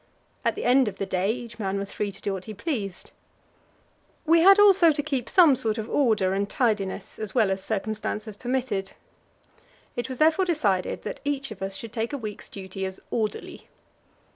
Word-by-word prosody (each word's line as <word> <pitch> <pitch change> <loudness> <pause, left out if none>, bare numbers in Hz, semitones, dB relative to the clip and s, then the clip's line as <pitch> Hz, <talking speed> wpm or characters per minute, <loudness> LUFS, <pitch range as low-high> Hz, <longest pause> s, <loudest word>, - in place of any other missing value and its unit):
At - - +1
the - - -5
end 255 0 +4
of 200 -1 -4
the 195 - -2
day 185 +1 0
each 235 -1 -7
man 195 -2 -1
was 200 0 -4
free 205 -1 -2
to - - -14
do 200 - -2
what 190 -1 -6
he 215 - -7
pleased. 205 - -4 1.1
We 330 +1 +5
had 390 +3 +8
also 390 -5 +7
to 290 -1 -2
keep 270 -5 -2
some 330 -7 +6
sort 225 -3 0
of 220 -1 -4
order 220 -10 +2
and 200 +1 -1
tidiness, 210 -6 -1
as 215 0 -5
well 220 -5 +3
as 190 0 -2
circumstances 215 0 -3
permitted. 245 -5 -2 1.0
It 240 +2 -3
was 260 - -5
therefore 320 +6 +4
decided 210 - 0
that - - -5
each 280 -3 -2
of 200 - -9
us 195 0 -4
should 225 +2 -8
take 230 +2 -2
a - - -1
week's 215 -5 -7
duty 190 -1 -7
as 190 0 -4
"orderly." 220 -3 -3
220 Hz, 190 wpm, -26 LUFS, 195-270 Hz, 1.1 s, had